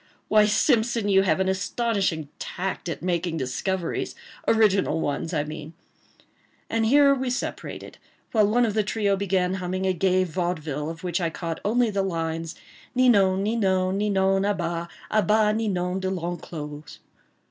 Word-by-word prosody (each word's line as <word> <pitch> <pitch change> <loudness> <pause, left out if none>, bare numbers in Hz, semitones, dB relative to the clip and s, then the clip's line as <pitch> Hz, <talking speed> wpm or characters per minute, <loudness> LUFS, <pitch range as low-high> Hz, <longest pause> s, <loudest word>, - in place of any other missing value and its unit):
ha!—why, 215 0 +6
Simpson, 225 +1 +2
you 195 -1 +5
have 185 -3 +1
an 190 - +1
astonishing 190 -4 -1
tact 185 -1 -4
at 165 - -5
making 175 -2 -1
discoveries—original 190 - 0
ones, 145 +2 -2
I 150 -4 0
mean." 155 +1 -8 1.0
And 225 -1 +1
here 280 +3 +6
we 260 -1 -2
separated, 250 - -5 0.3
while 215 -3 +4
one 240 +3 +3
of 215 - -1
the 215 - +2
trio 205 -1 0
began 190 -2 0
humming 185 +1 -2
a 190 - +2
gay 185 +1 +2
vaudeville, 160 -4 -3
of 165 +1 -8
which 180 0 -1
I 170 - +1
caught 165 0 -5
only 235 +2 +2
the 200 -1 0
lines— 165 -3 -3 0.4
Ninon, 200 -7 +4
Ninon, 190 -3 +1
Ninon 195 -2 +2
à 205 0 0
bas— 170 -1 -3 0.2
A 215 - +4
bas 210 +2 +3
Ninon 190 -4 -1
De 190 0 -2
L'Enclos! 165 -4 -6
190 Hz, 150 wpm, -25 LUFS, 170-210 Hz, 1.0 s, ha!—why